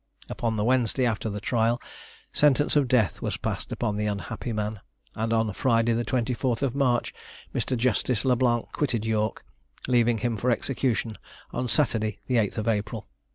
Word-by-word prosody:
Upon 115 -1 -1
the 105 - 0
Wednesday 125 +1 +2
after 110 -1 -1
the 105 0 -4
trial, 115 +2 +1 0.5
sentence 145 0 +3
of 145 -3 +4
death 120 -7 +2
was - - -2
passed - - -4
upon 105 -1 -1
the 105 0 0
unhappy 105 +4 -4
man, 105 -1 -2 0.3
and 110 +1 -2
on 110 -2 +1
Friday 115 +1 +2
the 115 +1 0
24th 125 +1 0
March 130 -4 +1 0.4
Mr. 130 - -1
Justice 120 -1 +1
Le 130 -1 +4
Blanc 120 -2 +2
quitted 120 -7 -1
York, 110 -1 -1 0.4
leaving 120 -2 +3
him 115 0 -1
for 120 +5 0
execution 120 -4 0 0.3
on 125 +1 -1
Saturday 110 -5 +1
the 125 - +1
8th 110 0 0
April. 105 0 -1
115 Hz, 160 wpm, -26 LUFS, 110-125 Hz, 0.5 s, of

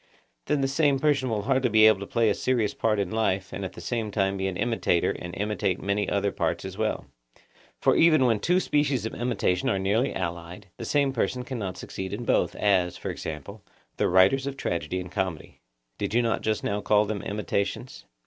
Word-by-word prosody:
Then 150 -2 +1
the 135 - +2
same 140 0 +2
person 135 -2 +1
will 105 -3 -1
hardly 130 +1 +2
be 110 0 +6
able 110 -3 +6
to 100 - -6
play 115 -3 +2
a - - +2
serious 120 -3 0
part 110 -1 0
in 100 -3 -1
life, 100 -4 -1
and 100 +1 -4
at 95 - -5
the - - -10
same 115 -3 -2
time 95 -1 0
to - - -4
be 95 - 0
an 95 -2 -3
imitator 115 -7 +1
and 85 0 -7
imitate 100 -3 -1
many 100 0 -1
other 100 0 0
parts - - -2
as - - -6
well; - - -2 0.7
for - - +3
even 155 -5 +5
when 115 -4 +2
two 180 - +2
species 145 - 0
of 110 - -4
imitation 115 -7 0
are 100 - +1
nearly 105 +7 +1
allied, 85 +2 -5
the - - -6
same 140 -2 +1
persons 125 +1 -1
cannot 105 -8 -4
succeed 95 0 -6
in - - -4
both, - - +1
as, 95 -4 +1
for - - -4
example, 80 +7 -7 0.4
the - - +2
writers 95 +10 +4
of 140 0 -4
tragedy 85 - -2
and 90 -1 -7
comedy—did 75 - -5
you 120 - +4
not 115 -1 0
just 110 0 -1
now 100 +1 -1
call 105 +1 +3
them 105 -1 -3
imitations? 100 -1 -3
105 Hz, 210 wpm, -26 LUFS, 95-125 Hz, 0.7 s, be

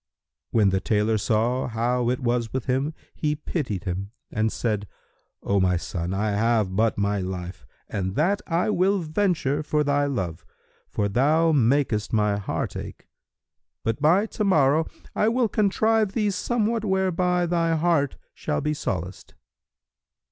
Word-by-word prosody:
When 105 -4 +3
the 95 - +1
tailor 110 +2 +1
saw 115 +5 +1
how 120 +1 0
it 125 - -1
was 120 -2 0
with 130 -3 -3
him, 135 +5 -1 0.2
he 150 -1 -1
pitied 145 - -3
him 95 +1 -3 0.2
and 110 0 0
said, 105 -3 -2 0.6
"O 100 0 +1
my 90 -1 +2
son, 85 0 -4
I 105 +2 0
have 105 -2 +1
but 110 +2 +2
my 100 0 0
life 90 -7 -6 0.2
and 95 -2 -3
that 195 +7 +1
I 175 +4 +1
will 195 +1 +2
venture 155 -4 0
for 150 0 0
thy 145 0 +1
love, 90 - -3 0.5
for 100 - -1
thou 150 +10 +3
makest 125 -5 +1
my 105 -2 +2
heart 100 - -3
ache. - - -8 0.8
But 115 +5 -1
by 175 +7 +4
to 215 - -3
morrow 155 -4 +3 0.3
I 215 - +3
will 240 0 +2
contrive 215 0 +2
thee 210 -3 +1
somewhat 225 +3 0
whereby 185 -3 +1
thy 165 -1 +1
heart 160 -4 +1 0.2
shall 75 - -2
be 150 +1 -1
solaced." 90 - -5
130 Hz, 150 wpm, -25 LUFS, 105-170 Hz, 0.8 s, by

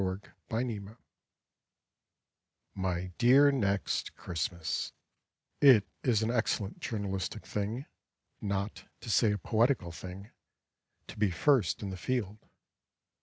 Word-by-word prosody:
TO 95 - +1
NEXT 95 +2 -7 0.2
CHRISTMAS 110 -2 -3 1.8
My 90 -1 -2
dear 135 +4 +7
Next 100 -7 0
Christmas, 85 -1 -3 0.7
It 125 -8 +8 0.2
is 115 -4 +2
an 110 - +1
excellent 110 -4 -1
journalistic 100 -4 -3
thing, 110 +6 -3 0.6
Not 100 +1 -3 0.2
to 115 - -4
say 110 0 +4
a 105 - 0
poetical 115 -4 +1
thing, 95 +5 -9 0.7
To - - -11
be 105 -2 +3
first 110 - +2
in 100 - -3
the 95 - -5
field. 105 -1 -2
105 Hz, 115 wpm, -31 LUFS, 95-120 Hz, 1.8 s, It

